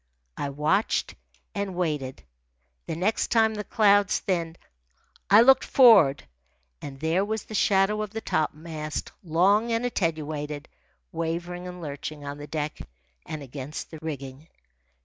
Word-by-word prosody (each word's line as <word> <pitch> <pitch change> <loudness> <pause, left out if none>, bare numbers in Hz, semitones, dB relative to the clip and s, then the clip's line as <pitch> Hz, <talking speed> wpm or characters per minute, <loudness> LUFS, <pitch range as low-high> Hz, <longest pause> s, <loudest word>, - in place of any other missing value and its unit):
I 145 - -3
watched 150 +9 0 0.4
and 200 -2 -3
waited. 150 -7 -2 0.6
The - - -3
next 190 +7 0
time 225 -1 +3
the 210 -1 -4
clouds 205 -2 +3
thinned 170 -3 -2 0.7
I 205 +3 +8
looked 265 +2 +6
for'ard, 200 - +6 0.5
and 135 -1 -8
there 165 +5 +1
was 220 +1 -3
the - - -11
shadow 205 0 +2
of 210 - -3
the 225 +3 -5
topmast, 155 -3 -3
long 195 +7 +3
and 230 +1 0
attenuated, 155 -7 -2 0.4
wavering 170 +2 -4
and 180 -1 -8
lurching 145 0 -6
on 145 +1 -6
the 145 - -8
deck 150 -1 -4 0.5
and 155 -2 -5
against 135 +2 -7
the 160 - -8
rigging. 140 -1 -7
165 Hz, 135 wpm, -26 LUFS, 150-205 Hz, 0.7 s, I